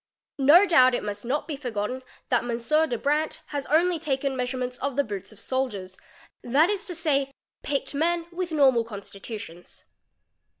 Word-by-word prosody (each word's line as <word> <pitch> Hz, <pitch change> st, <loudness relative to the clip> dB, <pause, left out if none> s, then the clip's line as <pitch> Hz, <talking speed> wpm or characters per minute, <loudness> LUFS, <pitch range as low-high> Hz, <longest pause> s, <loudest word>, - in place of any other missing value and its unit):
No 305 Hz, +8 st, +7 dB
doubt 255 Hz, -9 st, +5 dB
it -, -, -3 dB
must 205 Hz, +1 st, -5 dB
not 275 Hz, +5 st, -1 dB
e 310 Hz, -, -3 dB
forgotten 250 Hz, -2 st, -3 dB, 0.3 s
that 245 Hz, -, +3 dB
M. 245 Hz, +7 st, +1 dB
de 240 Hz, -, -1 dB
Brandt 300 Hz, +5 st, 0 dB
has 285 Hz, -2 st, -4 dB
only 335 Hz, +3 st, +3 dB
taken 275 Hz, -3 st, -1 dB
measurements 250 Hz, 0 st, -3 dB
of 275 Hz, -1 st, -2 dB
the 285 Hz, -, +2 dB
Boots 205 Hz, -5 st, -6 dB
of 215 Hz, -, -15 dB
soldiers, 210 Hz, -8 st, -3 dB, 0.5 s
that 295 Hz, +10 st, +3 dB
is 410 Hz, 0 st, -3 dB
to 355 Hz, -, -3 dB
say, 280 Hz, -4 st, 0 dB, 0.3 s
picked 280 Hz, 0 st, -2 dB
men 335 Hz, +3 st, +1 dB
with 350 Hz, 0 st, -4 dB
normal 265 Hz, -6 st, +4 dB
constitutions. 200 Hz, -4 st, -9 dB
270 Hz, 165 wpm, -26 LUFS, 235-310 Hz, 0.5 s, No